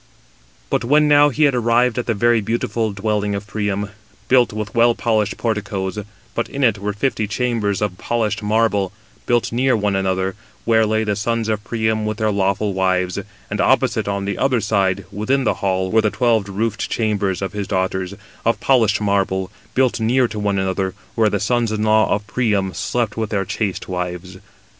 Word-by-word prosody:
But -, -, +1 dB
when 150 Hz, +5 st, +4 dB
now 145 Hz, 0 st, +6 dB
he 150 Hz, +3 st, 0 dB
had 140 Hz, -2 st, +4 dB
arrived 120 Hz, 0 st, +2 dB
at 120 Hz, -, -4 dB
the 115 Hz, -, +1 dB
very 120 Hz, +2 st, +3 dB
beautiful 115 Hz, 0 st, -1 dB
dwelling 105 Hz, 0 st, -1 dB
of 100 Hz, +1 st, -5 dB
Priam, 105 Hz, -1 st, -2 dB, 0.4 s
built 125 Hz, -2 st, +4 dB
with 105 Hz, -1 st, -5 dB
well 115 Hz, 0 st, +4 dB
polished 110 Hz, -3 st, 0 dB
porticoes; 105 Hz, -3 st, -2 dB, 0.3 s
but -, -, -2 dB
in 140 Hz, -, -3 dB
it 110 Hz, -5 st, +3 dB
were 105 Hz, +1 st, -2 dB
fifty 110 Hz, 0 st, -1 dB
chambers 115 Hz, -3 st, -1 dB
249 105 Hz, -2 st, 0 dB
of 90 Hz, -, -19 dB
polished 115 Hz, -3 st, 0 dB
marble, 105 Hz, -3 st, +1 dB, 0.4 s
built 120 Hz, -1 st, +1 dB
near 125 Hz, +1 st, +2 dB
one 105 Hz, -2 st, 0 dB
another, 95 Hz, 0 st, 0 dB, 0.3 s
where 110 Hz, -1 st, +3 dB
lay 110 Hz, +1 st, +1 dB
the 105 Hz, -1 st, 0 dB
sons 115 Hz, +2 st, -1 dB
of 105 Hz, -1 st, -1 dB
Priam 110 Hz, -1 st, -1 dB
with 110 Hz, -1 st, -3 dB
their 110 Hz, 0 st, +1 dB
lawful 100 Hz, +1 st, 0 dB
wives; 95 Hz, 0 st, 0 dB, 0.3 s
and -, -, 0 dB
opposite, -, -, +2 dB
on 100 Hz, -1 st, -2 dB
the 100 Hz, -, -3 dB
other 130 Hz, -3 st, +2 dB
side, 100 Hz, -3 st, 0 dB
within 125 Hz, +7 st, 0 dB
the 110 Hz, -, +2 dB
hall, 95 Hz, -1 st, 0 dB
were 110 Hz, -, +4 dB
the 110 Hz, -, +2 dB
twelve 110 Hz, -1 st, +1 dB
roofed 110 Hz, +2 st, -2 dB
chambers 105 Hz, -4 st, 0 dB
of 95 Hz, -, -3 dB
his 100 Hz, -2 st, -3 dB
daughters, 95 Hz, 0 st, -1 dB, 0.3 s
of 115 Hz, -, +1 dB
polished 110 Hz, -5 st, +3 dB
marble, 95 Hz, -2 st, 0 dB, 0.2 s
built 130 Hz, -2 st, +2 dB
near 120 Hz, +3 st, +2 dB
to 110 Hz, -1 st, -6 dB
one 100 Hz, -1 st, 0 dB
another, 95 Hz, 0 st, -1 dB, 0.2 s
where 110 Hz, -2 st, +3 dB
the 100 Hz, -, -1 dB
sons 115 Hz, +1 st, 0 dB
in 110 Hz, 0 st, -1 dB
law 110 Hz, 0 st, +3 dB
of 105 Hz, 0 st, 0 dB
Priam 105 Hz, -6 st, 0 dB
slept 120 Hz, -2 st, -2 dB
with 110 Hz, -2 st, -2 dB
their 100 Hz, -3 st, -1 dB
chaste 100 Hz, 0 st, -3 dB
wives. 90 Hz, 0 st, -5 dB
105 Hz, 190 wpm, -20 LUFS, 100-115 Hz, 0.4 s, now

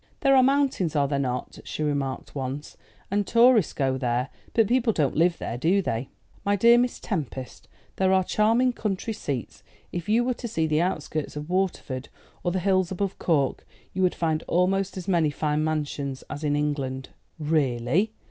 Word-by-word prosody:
"There 275 Hz, -1 st, +5 dB
are 260 Hz, -, +7 dB
mountains, 265 Hz, -, +2 dB
are 140 Hz, -1 st, +3 dB
there 140 Hz, 0 st, -1 dB
not?" 125 Hz, -2 st, -3 dB
she 155 Hz, -, -4 dB
remarked 140 Hz, -3 st, -2 dB
once; 140 Hz, +1 st, -5 dB, 0.4 s
"and 200 Hz, -1 st, +1 dB
tourists 235 Hz, -4 st, +5 dB
go 135 Hz, -2 st, 0 dB
there? 125 Hz, 0 st, 0 dB, 0.3 s
But 225 Hz, -, +5 dB
people 240 Hz, -1 st, +2 dB
don't 145 Hz, -7 st, +1 dB
live 170 Hz, +2 st, +3 dB
there, 120 Hz, -, -4 dB
do 175 Hz, +8 st, +3 dB
they?' 130 Hz, -8 st, -2 dB, 0.3 s
"My 200 Hz, 0 st, +2 dB
dear 235 Hz, +4 st, +6 dB
Miss 245 Hz, 0 st, 0 dB
Tempest, 135 Hz, -, -5 dB, 0.3 s
there 190 Hz, 0 st, +3 dB
are 190 Hz, 0 st, +4 dB
charming 230 Hz, +6 st, +2 dB
country 215 Hz, 0 st, -2 dB
seats; 135 Hz, -, -5 dB, 0.3 s
if 175 Hz, +3 st, -5 dB
you 230 Hz, +3 st, +4 dB
were 250 Hz, +1 st, +1 dB
to 240 Hz, -, -6 dB
see 165 Hz, -8 st, 0 dB
the 155 Hz, 0 st, +2 dB
outskirts 155 Hz, -4 st, -2 dB
of 150 Hz, +3 st, -6 dB
Waterford, 180 Hz, -8 st, -1 dB, 0.3 s
or 175 Hz, -, +1 dB
the 185 Hz, -, -1 dB
hills 185 Hz, -1 st, +2 dB
above 195 Hz, +1 st, -3 dB
Cork, 145 Hz, -6 st, +1 dB, 0.3 s
you 190 Hz, -, -2 dB
would 180 Hz, -1 st, +2 dB
find 160 Hz, -2 st, 0 dB
almost 190 Hz, +2 st, +1 dB
as 180 Hz, -, -6 dB
many 170 Hz, -5 st, +3 dB
fine 150 Hz, +1 st, -1 dB
mansions 145 Hz, -3 st, -2 dB
as 145 Hz, -, -6 dB
in 145 Hz, -1 st, +1 dB
England." 140 Hz, -3 st, -2 dB, 0.3 s
"Really?" 155 Hz, -, +1 dB
165 Hz, 180 wpm, -26 LUFS, 145-200 Hz, 0.4 s, are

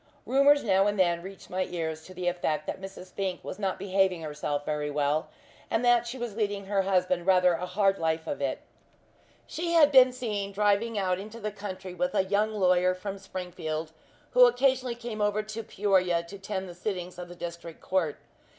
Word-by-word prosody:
Rumours 280 Hz, +2 st, +5 dB
now 195 Hz, -2 st, +3 dB
and 205 Hz, 0 st, 0 dB
then 175 Hz, -2 st, +3 dB
reached 190 Hz, +1 st, -11 dB
my 185 Hz, 0 st, 0 dB
ears 160 Hz, -2 st, -4 dB
to 185 Hz, -, -12 dB
the 180 Hz, 0 st, -3 dB
effect 175 Hz, -3 st, -1 dB
that -, -, -5 dB
Mrs. 190 Hz, -1 st, -9 dB
Fink 190 Hz, -2 st, -3 dB
was 185 Hz, -, -7 dB
not 195 Hz, -2 st, -1 dB
behaving 190 Hz, -3 st, +1 dB
herself 150 Hz, -1 st, -3 dB
very 150 Hz, -1 st, -2 dB
well, 145 Hz, +1 st, 0 dB, 0.4 s
and 230 Hz, +2 st, 0 dB
that 240 Hz, -1 st, +4 dB
she 250 Hz, +3 st, -5 dB
was 240 Hz, -4 st, -5 dB
leading 205 Hz, -3 st, -1 dB
her 200 Hz, 0 st, +1 dB
husband 185 Hz, -2 st, +1 dB
rather 180 Hz, -1 st, +5 dB
a 175 Hz, +2 st, -3 dB
hard 195 Hz, +1 st, +2 dB
life 160 Hz, 0 st, 0 dB
of 285 Hz, -, -4 dB
it. -, -, -1 dB, 0.8 s
She 340 Hz, +1 st, -3 dB
had 305 Hz, -3 st, +6 dB
been 260 Hz, -2 st, +8 dB
seen 210 Hz, -6 st, -3 dB
driving 210 Hz, +2 st, +1 dB
out 185 Hz, -2 st, 0 dB
into 215 Hz, +3 st, -8 dB
the 215 Hz, -1 st, -3 dB
country 190 Hz, -2 st, -7 dB
with 270 Hz, +9 st, -1 dB
a -, -, +4 dB
young 205 Hz, +3 st, +1 dB
lawyer 185 Hz, -3 st, +3 dB
from 195 Hz, +1 st, -6 dB
Springfield, 170 Hz, -5 st, -5 dB, 0.4 s
who 250 Hz, 0 st, +8 dB
occasionally 255 Hz, 0 st, +1 dB
came 235 Hz, -3 st, -6 dB
over 210 Hz, +1 st, +1 dB
to 215 Hz, +1 st, -6 dB
Peoria 190 Hz, -5 st, +1 dB
to 195 Hz, +4 st, -10 dB
attend 190 Hz, -1 st, -4 dB
the 175 Hz, -, -8 dB
sittings 180 Hz, -1 st, -5 dB
of 175 Hz, -, -6 dB
the 175 Hz, -, -9 dB
District 170 Hz, -1 st, -7 dB
Court. 175 Hz, -6 st, -1 dB
190 Hz, 195 wpm, -28 LUFS, 180-215 Hz, 0.8 s, been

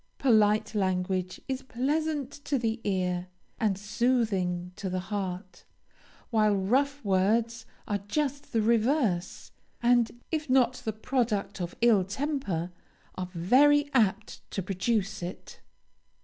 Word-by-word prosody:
Polite 215 Hz, -4 st, +3 dB
language 185 Hz, -2 st, -1 dB
is 265 Hz, 0 st, -2 dB
pleasant 285 Hz, +2 st, -1 dB
to 285 Hz, -1 st, -3 dB
the 225 Hz, -1 st, -2 dB
ear, 180 Hz, -2 st, -1 dB, 0.3 s
and 205 Hz, -4 st, +1 dB
soothing 205 Hz, -5 st, 0 dB
to 195 Hz, -, -4 dB
the 185 Hz, 0 st, -1 dB
heart, 190 Hz, -1 st, -5 dB, 0.7 s
while 215 Hz, -2 st, +3 dB
rough 265 Hz, +7 st, 0 dB
words 220 Hz, +4 st, +1 dB, 0.2 s
are 205 Hz, -1 st, -1 dB
just 285 Hz, +3 st, -2 dB
the 225 Hz, -2 st, +1 dB
reverse; 225 Hz, -, +1 dB, 0.3 s
and 240 Hz, -1 st, +2 dB
if 310 Hz, -3 st, -2 dB
not 255 Hz, -2 st, +4 dB
the 220 Hz, -, 0 dB
product 220 Hz, -3 st, -1 dB
of 175 Hz, 0 st, -4 dB
ill 225 Hz, -5 st, +5 dB
temper, 200 Hz, -, -2 dB, 0.4 s
are 180 Hz, -1 st, -5 dB
very 285 Hz, -, +4 dB
apt 220 Hz, -3 st, +1 dB
to 195 Hz, -, -3 dB
produce 205 Hz, +2 st, -1 dB
it. 175 Hz, +2 st, -8 dB
215 Hz, 120 wpm, -28 LUFS, 190-255 Hz, 0.7 s, ill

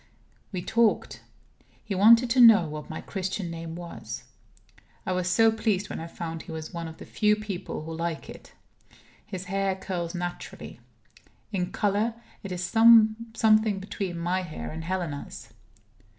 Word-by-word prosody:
We 180 Hz, -3 st, -4 dB
talked. 225 Hz, 0 st, +1 dB, 0.6 s
He 210 Hz, -, -4 dB
wanted 230 Hz, +6 st, +6 dB
to 255 Hz, -, +3 dB
know 220 Hz, -8 st, +8 dB
what 150 Hz, 0 st, -7 dB
my 160 Hz, -, -5 dB
Christian 190 Hz, -2 st, -4 dB
name 165 Hz, 0 st, -6 dB
was. 175 Hz, -1 st, -7 dB, 0.8 s
I -, -, -1 dB
was 180 Hz, 0 st, 0 dB
so 225 Hz, +4 st, +5 dB
pleased 215 Hz, -3 st, -1 dB
when -, -, -4 dB
I 165 Hz, -, -6 dB
found 165 Hz, -1 st, -6 dB
he -, -, -10 dB
was 160 Hz, +1 st, -6 dB
one 170 Hz, -1 st, -4 dB
of 160 Hz, -, -10 dB
the -, -, -10 dB
few 210 Hz, -1 st, +2 dB
people 200 Hz, -6 st, -5 dB
who 160 Hz, +1 st, -6 dB
like 165 Hz, 0 st, -3 dB
it. -, -, -12 dB, 0.7 s
His 190 Hz, -3 st, -7 dB
hair 195 Hz, +1 st, 0 dB
curls 180 Hz, -2 st, -4 dB
naturally. 175 Hz, 0 st, -6 dB, 0.7 s
In 180 Hz, -3 st, -2 dB
color, 210 Hz, +3 st, 0 dB, 0.3 s
it 195 Hz, -, -7 dB
is 180 Hz, 0 st, -3 dB
something 220 Hz, -1 st, +4 dB
between 190 Hz, -2 st, -4 dB
my 175 Hz, +2 st, 0 dB
hair 170 Hz, -4 st, -6 dB
and 160 Hz, +1 st, -6 dB
Helena's. 170 Hz, -5 st, -5 dB
185 Hz, 155 wpm, -27 LUFS, 170-215 Hz, 0.8 s, know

